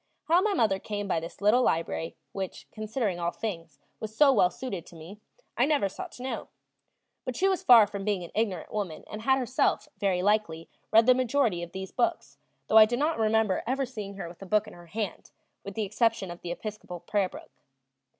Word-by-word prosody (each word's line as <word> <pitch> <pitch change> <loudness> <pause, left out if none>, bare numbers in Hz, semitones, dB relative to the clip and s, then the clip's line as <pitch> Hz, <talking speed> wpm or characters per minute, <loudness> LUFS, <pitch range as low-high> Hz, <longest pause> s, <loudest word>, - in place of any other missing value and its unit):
How 340 +3 +4
my 410 0 +1
mother 205 - +2
came 205 0 -4
by 170 - +1
this 165 +4 -9
little 215 +5 +5
library 165 -4 -1 0.2
which, 190 -2 -6
considering 215 -3 -2
all 170 0 0
things, 175 -5 -6 0.2
was 220 0 -7
so 285 -2 +6
well 190 -7 +4
suited 195 -3 -6
to - - -14
me 170 +6 -11 0.4
I 250 - +3
never 290 -10 +2
sought 190 - -7
to 245 - -9
know. 260 - -4 0.8
But 255 - -4
she 385 - +2
was 380 -2 +1
far 235 -4 +8
from 200 -1 -6
being 200 -3 -1
an 170 - -9
ignorant 205 -6 -2
woman 195 -7 -3
and 215 - -8
had 265 +3 +3
herself, 255 0 0
very 185 -3 +1
likely, 200 -6 0 0.2
read 225 +1 +6
the 255 - +7
majority 250 -7 +1
of 175 0 -7
these 190 0 -6
books, 345 -1 -1 0.3
though 220 - +4
I 215 - +10
do 240 +2 -2
not 300 0 0
remember 220 -3 +2
ever 270 +2 0
seeing 210 -6 -7
her 195 -3 -6
with 170 +2 -13
a 195 - -8
book 210 +2 +2
in 215 - -11
her 175 0 -14
hand, 205 +1 -4 0.3
with 200 -1 -8
the 220 - -1
exception 215 -2 0
of 175 - -10
the 175 - -5
Episcopal 205 -2 -6
Prayer 200 -3 0
book. - - -12
210 Hz, 215 wpm, -28 LUFS, 185-240 Hz, 0.8 s, I